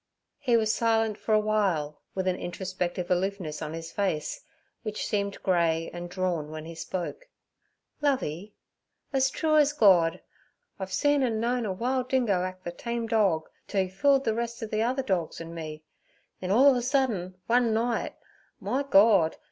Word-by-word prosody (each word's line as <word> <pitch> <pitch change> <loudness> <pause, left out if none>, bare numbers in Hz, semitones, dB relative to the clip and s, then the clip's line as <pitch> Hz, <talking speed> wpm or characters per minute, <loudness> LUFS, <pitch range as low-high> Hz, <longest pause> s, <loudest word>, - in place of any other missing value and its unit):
He 245 -4 +3
was 220 -1 +2
silent 225 -2 +1
for - - -4
a - - +5
while, 195 -9 0
with 190 -1 -1
an 185 - +2
introspective 180 -1 -4
aloofness 180 -4 -1
on 155 0 -4
his 165 0 -6
face, 185 -7 -2 0.4
which 215 -2 -4
seemed 200 -1 -2
grey 165 -3 +1
and 175 0 -6
drawn 175 -5 -2
when 155 0 -7
he 165 - -7
spoke. 185 - -5 0.7
'Lovey, 210 - -1 0.6
ez 265 0 +3
true 310 +2 +1
ez 295 -1 +4
Gord, 180 - +5 0.6
I've 190 -1 -5
see 290 +8 +2
an' 255 -6 +1
known 240 0 0
a - - -1
wile 250 +7 0
dingo 245 -8 +1
act 185 0 -5
ther 175 - -4
tame 235 +5 -4
dorg, 200 -8 +2 0.2
t' 205 - -4
'e 190 -1 +2
fooled 270 +8 +2
ther 225 - +2
rest 235 +1 -3
ov 220 - -6
ther 240 +5 0
dorgs 185 -8 -1
an' 165 0 -7
me; 155 -2 -7 0.6
then 185 - -4
all 260 +8 +6
of - - +2
a - - -1
sudden 240 -9 0
one 240 -1 +3
night, 230 +2 -1 0.4
my 235 +8 -1
Gord! 200 - +4
200 Hz, 170 wpm, -27 LUFS, 175-235 Hz, 0.7 s, all